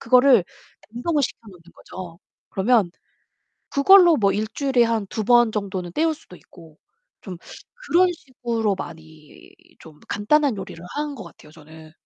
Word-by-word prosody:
그거를 250 -3 +5 0.5
냉동을 285 +7 -1
시켜 - - -3
놓는 180 -4 -16
거죠. 175 -3 -11 0.3
그러면 210 -2 +2 0.9
그걸로 350 +2 +7
뭐 200 -6 +2
1 215 +1 -2
주일에 270 -4 +1
한 225 -3 -1
2 220 - -4
번 240 -1 +4
정도는 190 -4 -4
때울 320 - 0
수도 300 - -17
있고 165 -3 -18 0.4
좀 185 -3 -8 0.5
그런 365 -1 +4
식으로 235 - -3
많이 160 - -12 0.3
좀 155 -2 -16
간단한 265 +5 +1
요리를 175 -3 -9
하는 295 0 -3
것 225 - -9
같아요, 155 -2 -16
저는. 155 0 -15
220 Hz, 280 characters per minute, -22 LUFS, 175-275 Hz, 0.9 s, 그걸로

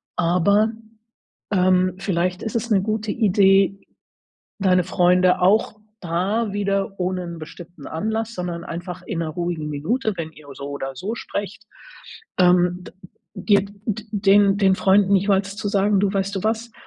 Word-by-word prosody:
aber, 180 +5 +2 0.8
ähm, 185 -1 +3
vielleicht 180 -1 -1
ist 220 - -5
es 230 +1 -3
'ne 195 -3 +3
gute 215 0 -2
Idee, 195 -2 +3 0.8
deine 185 -2 +3
Freunde 180 0 +3
auch 205 +4 +3 0.3
da 195 +6 -1
wieder 195 -1 -2
ohne 180 0 -1
'n 170 -1 -7
bestimmten 165 0 -11
Anlass, 220 +6 -3
sondern 175 -2 -4
einfach 175 +1 -6
in 170 - -4
'ner 165 - -2
ruhigen 170 -1 -3
Minute, 215 - -1
wenn 160 -1 -5
ihr 155 -2 -17
so 140 +1 -7
oder 135 -1 -5
so 200 - -4
sprecht, 205 -1 -6 0.7
ähm, 180 0 +3
d - - -12 0.4
dir 205 -2 +3 0.2
d 215 0 -3
den 200 -1 +4
den 195 -2 +3
Freunden 195 +1 +3
jeweils 195 0 0
zu 215 - -3
sagen: 200 0 +2
„Du 200 0 +1
weißt 195 0 -1
du 190 - -5
was? 225 +2 -1
190 Hz, 155 wpm, -22 LUFS, 175-205 Hz, 0.8 s, den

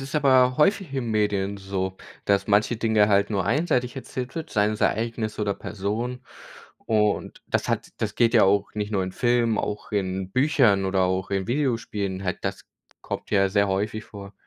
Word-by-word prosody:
es 135 +3 -8
aber 130 -3 +4
häufig 190 +4 +2
in 140 - -10
den 115 - -3
Medien 100 -2 0
so, 95 -1 -3 0.3
dass 100 -1 +2
manche 105 +3 +2
Dinge 110 -2 +3
halt 100 0 +3
nur 100 -4 -1
einseitig 125 - 0
erzählt 130 -1 -6
wird, 160 -1 -5
seien 105 0 +2
es 105 - -6
Ereignisse 110 -1 -1
oder 100 - 0
Personen. 115 +7 -4 0.6
Und 105 -2 0
das - - -1
hat - - -1
das - - -2
geht 115 -2 +3
ja 110 - +7
auch 100 +1 +2
nicht 105 -1 -3
nur 100 -3 0
in 95 - -6
Filmen, 120 -1 +1
auch 105 +1 -4
in 95 -2 -2
Büchern 130 -8 +3
oder 95 0 +1
auch 95 0 0
in 95 -1 -1
Videospielen, 115 -8 -2
halt, 90 -2 -2
das - - -3 0.4
kommt - - -6
ja 100 -2 +3
sehr 100 0 +2
häufig 105 +3 -2
vor. 100 -1 -11
105 Hz, 185 wpm, -25 LUFS, 100-120 Hz, 0.6 s, ja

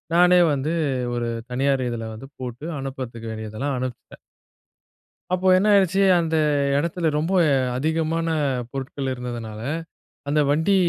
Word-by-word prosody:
நானே 180 +1 +6
வந்து 145 +4 -1 0.4
ஒரு 120 -1 -1 0.2
தனியார் 135 0 +1
இதுல 115 -1 -4
வந்து 135 +5 -10
போட்டு 125 +3 -6
அனுப்பறதுக்கு 125 -4 -6
வேண்டியதெல்லாம் 110 +6 -3
அனுப்பிச்சிட்டேன். 125 -1 -6 1.2
அப்போ 185 +1 +1
என்ன 205 +3 +2
ஆயிடுச்சு 195 0 +4 0.2
அந்த 165 -1 0 0.4
எடத்துல 170 +2 0
ரொம்ப 170 +5 -1 0.4
அதிகமான 160 +3 0 0.5
பொருட்கள் 135 0 -4
இருந்ததுனால, 120 -3 -6 0.7
அந்த 150 +1 +2
வண்டி 160 +7 +3
135 Hz, 115 wpm, -23 LUFS, 120-165 Hz, 1.2 s, நானே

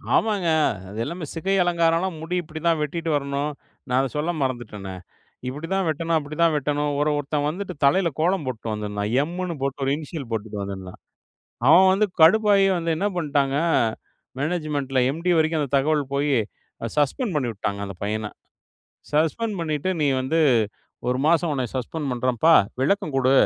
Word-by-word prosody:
ஆமாங்க, 205 -5 +1 0.4
அது 105 - -7
எல்லாமே 170 +4 -5
சிகை 190 +4 0
அலங்காரம்லாம் 170 0 +1
முடி 165 +3 -3
இப்டித்தான் 160 0 -1
வெட்டிட்டு 165 +2 -2
வரணும், 140 +1 -1 0.4
நான் 125 - +2
அத 135 - 0
சொல்ல 160 +4 0
மறந்துட்டனே. 105 -7 -4 0.5
இப்டிதான் 165 +8 -2
வெட்டணும், 165 +1 0
அப்டிதான் 155 +3 +1
வெட்டணும், 145 0 0
ஒரன், 150 0 +2
ஒருத்தன் 145 0 -1
வந்துட்டு 180 +3 -4
தலைல 170 +6 +4
கோலம் 175 0 +1
போட்டு 120 -3 -5
வந்திருந்தான். 105 -1 -3
எம்ன்னு 175 +2 -3
போட்டு 140 +1 -2
ஒரு 135 - +1
இனிஷியல் 150 -4 -7
போட்டு 105 -2 -3
வந்திருந்தான். 95 -2 -7 0.7
அவன் 185 +4 +8
வந்து 210 +2 +3
கடுப்பாயி 200 +3 +6
வந்து 165 -1 -1
என்ன 195 +5 0
பண்ட்டாங்க? 140 -4 +1 0.8
மேனேஜ்மெண்ட்ல 145 -4 -1
எம்டி 165 +5 -2
வரைக்கும் 160 0 +2
அந்த 140 - -4
தகவல் 150 +1 +2
போயி 140 0 +1 0.6
சஸ்பெண்ட் 155 - 0
பண்ணி 135 -5 0
உட்டுட்டாங்க 100 -1 -3
அந்த 100 - -7
பையன. 105 +1 -2 0.9
சஸ்பெண்ட் 175 +8 +1
பண்ணிட்டு, 155 0 -2
நீ 150 - +3 1.0
வந்து 125 +1 +1
மாசம் 165 0 +3
உன்ன 130 -3 -1
சஸ்பெண்ட் 145 +4 -3
பண்றேன்ப்பா, 125 +5 +2 0.3
விளக்கம் 155 +1 +1
குடு. 130 0 +3
150 Hz, 145 wpm, -24 LUFS, 135-170 Hz, 1.0 s, அவன்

